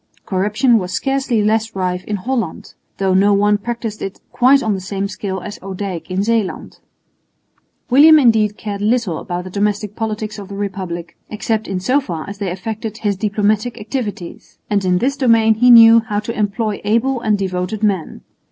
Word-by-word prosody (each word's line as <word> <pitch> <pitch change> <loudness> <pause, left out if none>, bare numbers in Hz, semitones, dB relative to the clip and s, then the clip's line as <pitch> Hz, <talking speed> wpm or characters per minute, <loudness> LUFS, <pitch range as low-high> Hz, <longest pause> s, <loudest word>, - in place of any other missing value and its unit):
Corruption 210 +5 +2
was 180 -1 -5
scarcely 265 -2 0
less 220 +1 0
rife 180 -1 -2
in 210 - -2
Holland, 225 -3 -4 0.2
though 190 -1 +1
no 200 +2 +4
one 205 +1 +2
practised 230 -1 -5
it 195 - -6
quite 265 +2 +4
on 220 -2 0
the 195 - -3
same 195 +1 -3
scale 195 -1 -5
as 205 +3 -8
Odijk 190 -2 -6
in 185 +2 -1
Zeeland. 225 -3 -2 1.1
William 310 +5 +8
indeed 220 -6 +3
cared 205 -2 -5
little 215 -6 0
about 175 -1 -5
the 185 - -9
domestic 205 +1 -1
politics 215 -1 -4
of 200 - -8
the 200 - -8
Republic, 185 -4 -5
except 220 0 -2
in 190 -1 -2
so 255 +10 +1
far 170 - -6
as 200 0 -8
they 200 -3 -2
affected 215 +4 -5
his 205 -2 -1
diplomatic 215 +3 -1
activities; 210 -5 -6
and 200 -1 +1
in 180 -1 +2
this 270 +8 0
domain 230 -5 +4
he 245 +3 +3
knew 230 -1 +9
how 220 -2 -4
to 220 +2 -5
employ 210 0 -2
able 235 +4 +1
and 215 -2 +1
devoted 190 +2 -3
men. 195 -6 -1
210 Hz, 180 wpm, -18 LUFS, 195-225 Hz, 1.1 s, knew